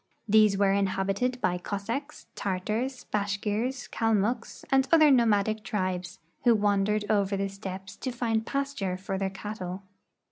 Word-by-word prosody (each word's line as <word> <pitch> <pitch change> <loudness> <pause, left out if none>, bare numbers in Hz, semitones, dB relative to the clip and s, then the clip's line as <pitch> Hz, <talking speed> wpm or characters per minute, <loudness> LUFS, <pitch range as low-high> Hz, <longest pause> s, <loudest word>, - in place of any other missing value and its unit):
These 215 -1 +5
were 195 -1 +3
inhab 195 -1 0
ited 250 +5 -1
by 180 0 +1
Cossacks, 230 +11 -4
Tartars, 215 +7 -2
Bashkirs, 210 +5 -1
Kalmucks, 225 +1 0
and 270 0 +4
other 310 -3 +7
no 245 -3 +5
madic 215 0 +2
tribes, 185 -3 -3 0.3
who 240 -2 +6
wandered 205 0 +1
over 200 -2 +1
the 195 0 -1
steppes 195 -1 -7
to 260 - -3
find 230 -2 0
pasture 275 -9 -2
for 190 0 -4
their 195 -1 0
cattle. 195 -2 -6
205 Hz, 145 wpm, -28 LUFS, 195-235 Hz, 0.3 s, other